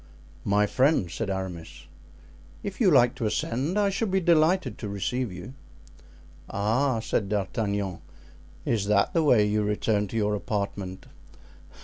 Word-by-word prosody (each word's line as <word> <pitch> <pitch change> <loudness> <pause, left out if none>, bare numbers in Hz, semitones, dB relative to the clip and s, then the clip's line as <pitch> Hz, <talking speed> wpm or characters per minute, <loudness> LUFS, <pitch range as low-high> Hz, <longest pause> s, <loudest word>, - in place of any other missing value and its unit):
"My 105 +1 +3
friend," 130 - +2
said 110 +3 -3
Aramis, 95 -4 -5 0.8
"if 200 +3 -5
you 205 - +6
like 125 -6 +5
to 115 - -1
ascend 130 - -1
I 200 -1 +2
shall 220 +3 -1
be 190 0 +1
delighted 170 +1 +2
to 105 - -5
receive 105 +4 -2
you." 90 +8 -9 1.0
"Ah," 115 +5 +1
said 105 -3 -1
D'Artagnan, 100 -2 -2 0.7
"is 110 -4 0
that 100 -1 +2
the 165 - +3
way 120 -8 +5
you 105 +1 +1
return 105 0 0
to 115 - -5
your 105 -1 +1
apartment?" 100 -1 -4
105 Hz, 140 wpm, -26 LUFS, 100-135 Hz, 1.0 s, you